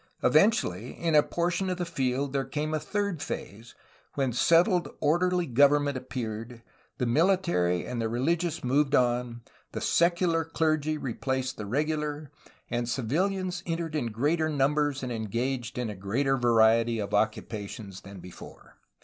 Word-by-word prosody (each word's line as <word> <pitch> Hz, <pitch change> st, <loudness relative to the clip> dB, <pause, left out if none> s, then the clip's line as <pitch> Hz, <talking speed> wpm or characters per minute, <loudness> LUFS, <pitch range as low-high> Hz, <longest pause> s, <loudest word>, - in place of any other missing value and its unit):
Eventually, 140 Hz, -, +2 dB
in 165 Hz, -1 st, -1 dB
a 150 Hz, -, +7 dB
portion 175 Hz, +4 st, -1 dB
of 180 Hz, -, -2 dB
the 175 Hz, -, -2 dB
field 135 Hz, -2 st, -1 dB
there 135 Hz, -1 st, 0 dB
came 150 Hz, +4 st, -3 dB
a 155 Hz, -, +1 dB
third 200 Hz, +1 st, -2 dB
phase, 115 Hz, -4 st, -7 dB, 0.4 s
when 135 Hz, -3 st, 0 dB
settled 170 Hz, -, +3 dB
orderly 175 Hz, +3 st, +2 dB
government 145 Hz, +2 st, +3 dB
appeared, 115 Hz, -2 st, -6 dB, 0.3 s
the 125 Hz, -, -1 dB
military 150 Hz, -, +2 dB
and 125 Hz, -2 st, -3 dB
the 115 Hz, -, 0 dB
reUgious 165 Hz, +8 st, -1 dB
moved 140 Hz, +3 st, +2 dB
on, 120 Hz, -1 st, +1 dB, 0.3 s
the -, -, -3 dB
secular 170 Hz, -1 st, +2 dB
clergy 155 Hz, -1 st, 0 dB
replaced 130 Hz, 0 st, -3 dB
the 105 Hz, -, -6 dB
regular, 150 Hz, +3 st, -2 dB, 0.4 s
and 120 Hz, 0 st, -2 dB
civilians 180 Hz, -, -1 dB
entered 165 Hz, -1 st, -3 dB
in 145 Hz, -6 st, -1 dB
greater 150 Hz, +8 st, 0 dB
numbers 145 Hz, -1 st, +1 dB
and 125 Hz, -, -3 dB
engaged 120 Hz, +2 st, -3 dB
in 125 Hz, -1 st, -1 dB
a -, -, -7 dB
greater 120 Hz, +9 st, 0 dB
variety 115 Hz, -1 st, +3 dB
of 105 Hz, -1 st, -4 dB
occupations 105 Hz, -2 st, -2 dB
than 100 Hz, -1 st, -11 dB
before. 90 Hz, 0 st, -13 dB
135 Hz, 145 wpm, -28 LUFS, 115-160 Hz, 0.4 s, a